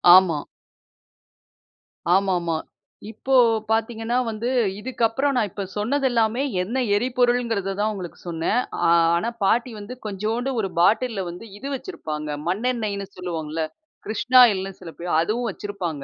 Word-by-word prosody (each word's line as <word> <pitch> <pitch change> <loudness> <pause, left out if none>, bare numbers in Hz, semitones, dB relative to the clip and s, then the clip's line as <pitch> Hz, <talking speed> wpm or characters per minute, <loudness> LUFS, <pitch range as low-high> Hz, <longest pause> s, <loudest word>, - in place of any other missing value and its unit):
ஆமா. 170 -6 +4 1.7
ஆமாமா. 180 -4 +2 0.6
இப்போ 270 +3 -3 0.4
பாத்தீங்கன்னா 225 +1 0
வந்து, 225 +2 -3 0.3
இதுக்கப்புறம் 260 +3 0
நான் 215 -4 +1
இப்ப 200 - -4
சொன்னதெல்லாமே 240 0 +1 0.2
என்ன 235 +8 -1
எரிபொருள்ங்கிறத 240 -4 +1
தான் 215 +1 +1
உங்களுக்கு 180 -4 -7
சொன்னேன். 170 +8 0 0.3
ஆ - - +4 0.3
ஆனா, 195 +7 0
பாட்டி 235 +5 +2
வந்து 205 +5 -7
கொஞ்சோண்டு 215 +6 -2
ஒரு 195 - -1
பாட்டில்ல 215 +3 +3
வந்து 175 +6 -9
இது 270 - -7
வச்சிருப்பாங்க, 155 - -5 0.2
மண்ணெண்ணெய்ன்னு 210 0 -1
சொல்லுவோம்ல்ல, 165 -3 -3 0.4
கிருஷ்ணாயில்ன்னு 220 -4 +4
சில 175 -3 -9
பேர், 175 +1 -4
அதுவும் 230 +7 -1
வச்சிருப்பாங்க. 180 -7 -5
215 Hz, 115 wpm, -23 LUFS, 185-240 Hz, 1.7 s, ஆமா